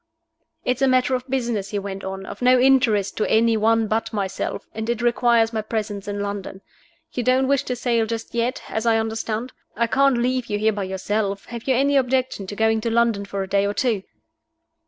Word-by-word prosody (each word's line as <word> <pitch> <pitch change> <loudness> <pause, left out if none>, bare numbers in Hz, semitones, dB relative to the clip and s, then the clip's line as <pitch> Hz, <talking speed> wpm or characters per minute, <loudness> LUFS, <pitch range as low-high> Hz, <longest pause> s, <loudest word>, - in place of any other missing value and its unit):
"It's 250 +1 0
a 270 - +4
matter 255 0 +3
of 255 +1 -2
business," 235 -6 -1
he 205 - -3
went 195 -1 -5
on, 190 0 -5
"of - - -9
no 250 0 +5
interest 245 -6 +3
to 215 - 0
any 225 +1 +4
one 225 +1 +3
but 220 +1 -1
myself, 195 -3 -3
and 220 +1 -4
it 235 -2 0
requires 235 -1 +3
my 220 - 0
presence 210 -2 -4
in 205 0 -3
London. 200 -1 -5 0.5
You 250 - -2
don't 255 +2 +2
wish 275 -1 +3
to 250 - -2
sail 235 -2 0
just 225 0 -5
yet, 235 +3 -1
as 220 +1 -2
I 225 -1 +4
understand? 225 +2 -3 0.2
I 235 - +2
can't 270 +2 +3
leave 250 +1 0
you 205 - -1
here 215 +1 +2
by 200 -2 -3
yourself. 200 +1 -2
Have 235 +1 -7
you 260 - +3
any 280 +2 +3
objection 255 -6 0
to 205 - -6
going 220 +1 +2
to 230 - -1
London 230 -3 +1
for 200 -1 -3
a - - -6
day 200 +1 +2
or 205 - -3
two?" 225 -3 +1
225 Hz, 215 wpm, -22 LUFS, 205-250 Hz, 0.5 s, no